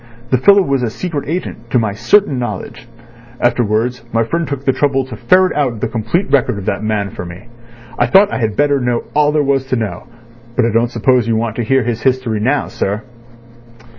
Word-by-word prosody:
The 130 - +3
fellow 200 +8 +6
was 140 -5 0
a 120 - 0
secret 145 +2 -5
agent 155 -8 -5
to 125 - +2
my 110 -3 +1
certain 150 - +2
knowledge. 115 0 -6 0.5
Afterwards 120 0 0
my 115 0 +2
friend 165 +7 -2
took 140 -1 -5
the 135 - +4
trouble 135 -1 +1
to 130 -4 -8
ferret 185 - +3
out 130 -7 0
the - - -1
complete 130 - -2
record 130 -5 +2
of 100 - -6
that - - -1
man 105 -2 -1
for - - -7
me. 90 +6 -10 0.5
I 120 - +3
thought 195 - +5
I - - -1
had 110 -3 -1
better 145 -1 +2
know 120 -2 -1
all 150 0 +3
there 150 -1 +1
was 135 -1 0
to 130 - 0
know; 110 -4 -4 0.5
but 125 - +2
I 115 - +1
don't 115 +1 +2
suppose 120 0 +2
you 115 - +1
want 110 -1 -2
to 120 - 0
hear 130 +3 +2
his 115 -1 -3
history 130 -4 0
now, 135 +7 +1
sir?" 105 +3 -3
125 Hz, 215 wpm, -16 LUFS, 115-140 Hz, 0.5 s, fellow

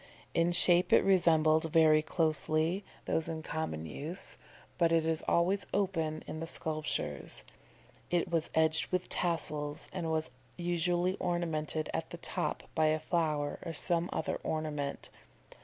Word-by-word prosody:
In 170 +1 +2
shape 175 +1 +5
it - - +6
resembled, 160 -4 +4
very 155 -1 +5
closely, 160 +3 0 0.2
those 160 - 0
in 160 -1 -4
common 155 - -3
use; 150 - -6 0.4
but 170 -1 +4
it 165 -1 +3
is 160 0 0
always 185 +4 +2
open 165 -6 -1
in 155 - -6
the 165 - -4
sculptures. 155 -1 -3 0.7
It 175 -1 +1
was 165 -2 0
edged 160 0 +2
with 180 -1 -1
tassels, 150 -3 -2
and 175 -3 -3
was 160 -4 -1 0.3
usually 175 +2 0
ornamented 160 -3 -1
at - - -3
the - - -7
top - - -2
by 155 -1 +3
a 155 0 +2
flower 155 -3 -1
or 165 - -5
some 170 +2 +4
other 160 - -2
ornament. 150 -3 -3
160 Hz, 140 wpm, -32 LUFS, 155-175 Hz, 0.7 s, it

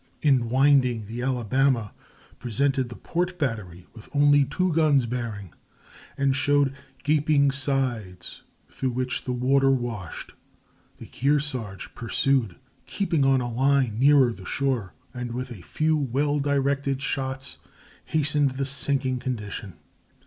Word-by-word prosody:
In 130 -6 +3
winding 130 -3 +3
the 115 +4 -6
Alabama 125 -2 +1 0.5
presented 130 +2 0
the 120 - -8
port 180 +1 -2
battery 105 - -3
with 110 -2 -13
only 145 0 +5
two 185 +4 -1
guns 150 -5 +3
bearing, 115 -6 -5 0.6
and 135 -1 +2
showed 145 -1 +2 0.3
gaping 145 -1 +3
sides 125 -10 -2 0.3
through 130 - -3
which 125 +1 -3
the 125 - -2
water 135 +2 +2
washed. 120 - -3 0.6
The - - -10
Kearsarge 135 -7 -2
pursued, 120 -3 0 0.3
keeping 170 -7 0
on 135 -1 +3
a 120 -1 -4
line 130 -3 +2
nearer 135 -3 +5
the 100 - -12
shore, 125 - -1 0.2
and 125 -2 -5
with 125 +1 -5
a 105 -7 -9
few 155 - 0
well 145 +1 0
directed 140 -1 0
shots 135 0 -3 0.5
hastened 145 -2 +1
the 135 - -1
sinking 135 -2 0
condition. 105 -6 -5
135 Hz, 125 wpm, -25 LUFS, 120-140 Hz, 0.6 s, only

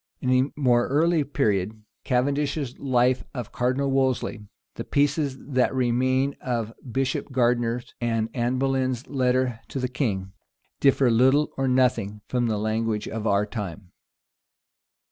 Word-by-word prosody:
In 130 - -1 0.2
a - - -12
more 120 -3 +3
early 160 +3 +2
period, 110 -7 -1 0.2
Cavendish's 140 +1 0
life 125 -1 +2
of 120 -4 -5
Cardinal 130 +3 0
Wolsey, 130 -5 0 0.3
the - - -6
pieces 145 -1 0
that 130 -1 0
remain 130 +2 +1
of 115 -3 -2 0.2
Bishop 135 +3 -1
Gardiner, 120 -1 +1 0.2
and 115 -2 0
Anne 120 +1 0
Boleyn's 130 -2 0
letter 130 -3 0
to - - -6
the 125 - 0
king, 105 -8 -2 0.5
differ 135 -2 +4
little 130 +6 +4
or 135 0 0
nothing 125 -5 +1
from 125 -1 0
the 110 -2 0
language 110 0 -1
of 110 0 -3
our 100 0 +2
time. 105 -4 -7
125 Hz, 135 wpm, -25 LUFS, 115-135 Hz, 0.5 s, differ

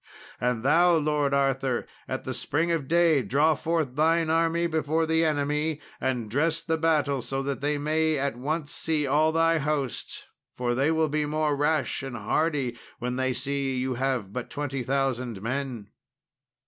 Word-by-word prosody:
And 125 -2 0
thou, 170 +5 +5
Lord 150 -2 +1
Arthur, 135 -2 +1 0.2
at - - -4
the - - -4
spring 165 +4 -1
of 160 -5 -1
day 165 -3 +4
draw 145 +8 +3
forth 155 -3 -1
thine 160 +1 +2
army 165 +1 +2
before 160 0 0
the 160 +1 +2
enemy, 150 0 0 0.2
and 125 -4 -1
dress 155 +8 0
the 160 0 -1
battle 150 -4 +2
so 135 +3 -3
that 140 0 -3
they 145 +1 0
may 155 +1 +1
at 140 -3 -1
once 150 +4 -3
see 155 -2 -1
all 150 +3 +3
thy 165 0 +3
host, 140 -3 -3 0.3
for 120 -1 0
they 135 +5 +2
will 160 -1 +2
be 150 +1 0
the 150 - -1
more 150 -1 0
rash 150 +2 0
and 135 -3 -5
hardy 145 -7 0 0.2
when 125 +1 -3
they 130 0 0
see 135 +1 -2
you 130 +1 -1
have 125 -6 -2
but 125 0 -4
20,000 135 -4 -2
men." 120 -2 -4
145 Hz, 170 wpm, -26 LUFS, 130-160 Hz, 0.3 s, thou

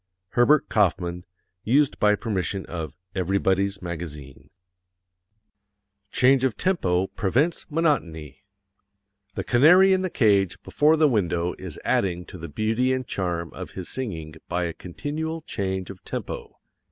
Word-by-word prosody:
_ - - -56 0.3
HERBERT 130 +7 +4
KAUFMAN. 90 -3 0 0.4
Used 140 +5 +2
by 105 0 +4
permission 100 -3 -3
of 80 -2 -6 0.2
Everybody's 95 +1 0
Magazine. 75 -5 -7 1.6
Change 130 +1 +4
of 130 -5 0
Tempo 95 - +1
Prevents 125 - 0
Monotony 95 - -1 0.9
The - - -2
canary 180 +10 +6
in 190 - +2
the 185 - -1
cage 100 - +2
before 155 +2 +3
the 155 -1 +5
window 90 - 0
is - - -6
adding 90 -2 0
to 90 - -11
the 85 0 -7
beauty 110 - 0
and 130 0 -1
charm 85 -6 -3
of - - -8
his 90 - -6
singing 85 -12 -5 0.2
by 90 0 0
a 85 -1 -2
continual 155 - -5
change 95 - -3
of 95 - -14
tempo. - - -6
100 Hz, 135 wpm, -25 LUFS, 85-130 Hz, 1.6 s, canary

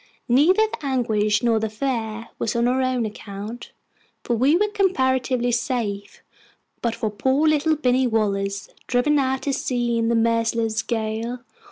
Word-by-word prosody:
Neither 305 - +4
the 435 - -7
anguish 220 -6 +1
nor 230 -2 +3
the 220 0 -2
fear 230 -1 -3
was 225 - -1
on 235 +1 +2
our 255 +1 +1
own 255 -2 0
account, 210 +2 -7 0.5
for 240 - 0
we 265 +7 +3
were 420 +3 +2
comparatively 260 - +1
safe, 230 -4 -3 0.6
but 235 -1 -1
for 225 -3 -2
poor 265 +8 +1
little 310 +1 +3
Binny 255 -3 +2
Wallace, 200 -3 -1 0.2
driven 285 +4 +2
out 265 -1 0
to 280 - -1
sea 240 -3 -1
in 230 0 +1
the 235 - +2
merciless 230 -1 +1
gale. 225 +2 -3
240 Hz, 155 wpm, -23 LUFS, 220-265 Hz, 0.6 s, Neither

